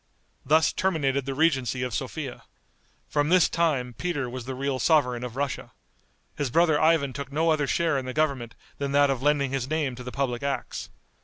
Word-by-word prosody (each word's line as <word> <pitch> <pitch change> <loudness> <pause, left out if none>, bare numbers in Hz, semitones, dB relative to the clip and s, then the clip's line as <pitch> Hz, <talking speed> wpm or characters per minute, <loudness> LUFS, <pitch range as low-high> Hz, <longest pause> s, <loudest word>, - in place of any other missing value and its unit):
Thus 155 +4 +3
terminated 140 -7 0
the 135 - -2
regency 130 -5 +1
of 125 -2 -3
Sophia. 135 +1 -4 0.7
From 145 0 0
this 180 0 +5
time 145 -8 0
Peter 145 +1 -2
was 125 0 -6
the 130 0 -4
real 135 0 -2
sovereign 125 -7 +2
of 125 -1 -6
Russia. 140 0 -3 0.6
His 145 -3 -2
brother 160 +1 +3
Ivan 155 -4 +3
took 140 0 -6
no 160 +3 +2
other 150 -2 +1
share 160 -1 +1
in 130 - -6
the 130 - -4
government 140 -7 0 0.2
than 140 -1 -2
that 145 -1 +5
of 130 -2 -2
lending 140 -2 +2
his 135 -1 -2
name 155 -4 0
to 125 +1 -9
the 125 - -6
public 125 -3 -2
acts. 140 -1 -3
140 Hz, 190 wpm, -26 LUFS, 130-155 Hz, 0.7 s, this